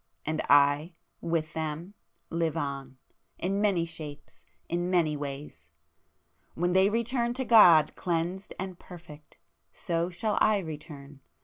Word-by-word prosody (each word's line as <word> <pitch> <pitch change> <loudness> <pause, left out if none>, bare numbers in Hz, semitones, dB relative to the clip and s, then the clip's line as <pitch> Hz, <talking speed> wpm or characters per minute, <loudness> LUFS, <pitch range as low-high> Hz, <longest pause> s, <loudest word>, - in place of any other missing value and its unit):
And 155 +1 -1
I, 145 +4 +4 0.3
with 165 -1 -2
them 160 +4 -4 0.4
live 165 -1 -1
on, 135 -3 -4 0.4
in 195 +3 -1
many 195 -5 +2
shapes, 155 -3 -9 0.2
in 175 +1 -2
many 170 -4 +2
ways!—when 145 +4 -7
they 190 +1 +5
return 235 +2 -1
to 260 0 -2
God 170 -10 +7
cleansed 175 +3 -2
and 185 -1 -6
perfect, 160 -4 -13 0.4
so 170 0 -2
shall 210 +4 -1
I 215 -1 +4
return! 150 -5 -8
165 Hz, 120 wpm, -28 LUFS, 150-185 Hz, 0.4 s, God